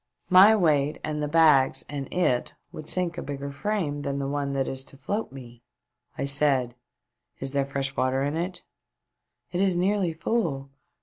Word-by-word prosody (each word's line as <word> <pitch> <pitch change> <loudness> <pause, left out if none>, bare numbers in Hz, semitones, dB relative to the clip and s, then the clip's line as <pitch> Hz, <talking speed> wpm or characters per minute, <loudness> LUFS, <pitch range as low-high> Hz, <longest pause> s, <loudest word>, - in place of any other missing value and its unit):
My 195 +4 +8
weight 150 -6 +2
and 150 -1 -3
the 150 - -1
bags 150 -4 +4
and 140 -2 -6
it 150 -9 0 0.2
would 155 - -9
sink 175 -2 -1
a - - -4
bigger 140 0 -5
frame 155 -3 -2
than 140 -1 -3
the 140 -1 -2
one 140 0 -2
that 135 -1 -1
is 130 0 -3
to 135 - -14
float 200 +12 -3
me." 120 -3 -12 0.6
I - - -1
said: 140 -3 +1 0.7
"Is 135 0 -3
there 140 -1 0
fresh 135 0 -3
water 130 +1 +1
in 145 +2 -1
it 175 +2 -4 0.3
?" - - -58
" - - -53
It 180 - -1
is 190 -3 +3
nearly 185 -1 +1
full. 160 -7 -2
145 Hz, 185 wpm, -26 LUFS, 135-175 Hz, 0.7 s, My